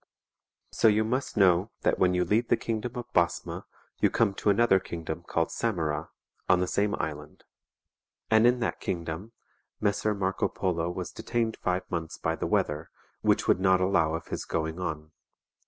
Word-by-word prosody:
So -, -, +3 dB
you 110 Hz, 0 st, +4 dB
must 125 Hz, +2 st, -2 dB
know 95 Hz, 0 st, +4 dB
that -, -, +1 dB
when 90 Hz, -1 st, +3 dB
you 90 Hz, 0 st, +2 dB
leave 115 Hz, +3 st, +1 dB
the -, -, +3 dB
kingdom 115 Hz, +1 st, -3 dB
of 120 Hz, 0 st, -7 dB
Basma 85 Hz, 0 st, 0 dB, 0.3 s
you -, -, +4 dB
come 110 Hz, -4 st, +2 dB
to 105 Hz, -, 0 dB
another 100 Hz, -1 st, +4 dB
kingdom 85 Hz, -2 st, -5 dB
called 85 Hz, -1 st, -1 dB
Samara, 80 Hz, -8 st, -1 dB, 0.4 s
on 90 Hz, -1 st, +5 dB
the 90 Hz, -, +1 dB
same 100 Hz, +3 st, 0 dB
Island.^ 75 Hz, -1 st, -5 dB, 0.9 s
And 110 Hz, +2 st, +6 dB
in 125 Hz, 0 st, +2 dB
that -, -, -1 dB
kingdom 85 Hz, +4 st, -4 dB, 0.5 s
Messer 105 Hz, +1 st, +1 dB
Marco 95 Hz, -1 st, 0 dB
Polo 85 Hz, -3 st, -1 dB
was 90 Hz, 0 st, -5 dB
detained 115 Hz, -2 st, -2 dB
five 90 Hz, 0 st, -1 dB
months 80 Hz, -2 st, -3 dB
by -, -, -1 dB
the -, -, -3 dB
weather, 75 Hz, +2 st, 0 dB, 0.3 s
which -, -, +2 dB
would -, -, +4 dB
not 95 Hz, -1 st, +4 dB
allow 85 Hz, -4 st, +2 dB
of 80 Hz, -, -7 dB
his -, -, -3 dB
going 80 Hz, +1 st, -3 dB
on. 80 Hz, -3 st, -4 dB
95 Hz, 170 wpm, -28 LUFS, 85-110 Hz, 0.9 s, And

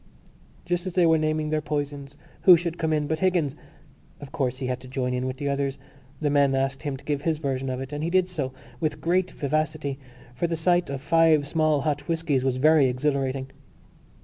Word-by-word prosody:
Just 175 Hz, +1 st, -1 dB
as 185 Hz, -, -4 dB
they 180 Hz, -1 st, +4 dB
were 160 Hz, -1 st, +4 dB
naming 155 Hz, 0 st, -1 dB
their 155 Hz, 0 st, +1 dB
poisons 145 Hz, -1 st, -4 dB, 0.2 s
who 180 Hz, -2 st, +8 dB
should 170 Hz, 0 st, -4 dB
come 160 Hz, -1 st, 0 dB
in 150 Hz, -1 st, +1 dB
but 155 Hz, +1 st, -2 dB
Higgins! 175 Hz, -7 st, +1 dB, 0.6 s
Of 145 Hz, -2 st, -10 dB
course 130 Hz, -2 st, -1 dB
he 130 Hz, -, -4 dB
had 125 Hz, 0 st, -2 dB
to 130 Hz, -, -13 dB
join 125 Hz, -1 st, -2 dB
in 125 Hz, +1 st, -1 dB
with 130 Hz, 0 st, -4 dB
the 145 Hz, -, -3 dB
others. 140 Hz, -1 st, -1 dB, 0.4 s
The 150 Hz, -2 st, 0 dB
men 140 Hz, -2 st, +3 dB
asked 135 Hz, 0 st, -1 dB
him 145 Hz, -3 st, -3 dB
to -, -, -17 dB
give 145 Hz, -2 st, -1 dB
his 160 Hz, 0 st, 0 dB
version 135 Hz, -3 st, -2 dB
of 130 Hz, 0 st, -3 dB
it, 135 Hz, +2 st, -6 dB
and 145 Hz, +1 st, -3 dB
he 165 Hz, -, 0 dB
did 185 Hz, 0 st, +3 dB
so 150 Hz, -8 st, -3 dB, 0.3 s
with 155 Hz, +1 st, -1 dB
great 180 Hz, +2 st, +1 dB
vivacity 155 Hz, -1 st, -2 dB, 0.3 s
for 170 Hz, +8 st, -1 dB
the 165 Hz, -, -1 dB
sight 175 Hz, +1 st, +2 dB
of 140 Hz, -1 st, -4 dB
five 160 Hz, -1 st, +4 dB
small 155 Hz, -2 st, +2 dB
hot 145 Hz, -1 st, -2 dB
whiskies 160 Hz, -6 st, 0 dB
was 130 Hz, -1 st, 0 dB
very 155 Hz, 0 st, +5 dB
exhilarating. 135 Hz, 0 st, -1 dB
145 Hz, 215 wpm, -25 LUFS, 135-160 Hz, 0.6 s, who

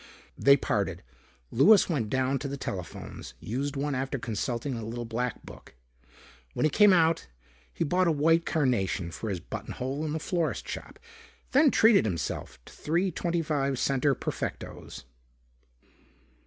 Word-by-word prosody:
They 140 Hz, 0 st, +5 dB
parted. -, -, -2 dB, 0.5 s
Louis 195 Hz, -, +6 dB
went 130 Hz, -, -1 dB
down 130 Hz, +2 st, 0 dB
to 145 Hz, -, -4 dB
the 140 Hz, 0 st, -4 dB
telephones, 90 Hz, -, -7 dB
used 135 Hz, +6 st, -3 dB
one 145 Hz, +1 st, -1 dB
after 135 Hz, +1 st, -2 dB
consulting 120 Hz, +3 st, -3 dB
a 115 Hz, -2 st, -5 dB
little 120 Hz, +2 st, -5 dB
black 120 Hz, +1 st, -3 dB
book. -, -, -13 dB, 0.8 s
When -, -, 0 dB
he 155 Hz, -, +3 dB
came 210 Hz, +4 st, +6 dB
out, 165 Hz, -2 st, +3 dB, 0.4 s
he -, -, -2 dB
bought 180 Hz, +4 st, +2 dB
a -, -, +4 dB
white 165 Hz, +3 st, +3 dB
carnation 110 Hz, -, 0 dB
for 110 Hz, -, -5 dB
his 95 Hz, -3 st, -2 dB
button -, -, -7 dB
hole 135 Hz, +4 st, -3 dB
in 155 Hz, -1 st, -2 dB
the 160 Hz, -, -2 dB
florist 170 Hz, 0 st, -2 dB
shop, -, -, -7 dB, 0.5 s
then 285 Hz, +2 st, +6 dB
treated 220 Hz, -, +5 dB
himself 85 Hz, -9 st, -3 dB
to -, -, -14 dB
three 175 Hz, +5 st, 0 dB
twenty 170 Hz, 0 st, -1 dB
five 140 Hz, -3 st, 0 dB
center 135 Hz, +2 st, +1 dB
Perfectos. -, -, -6 dB
140 Hz, 155 wpm, -28 LUFS, 120-165 Hz, 0.8 s, Louis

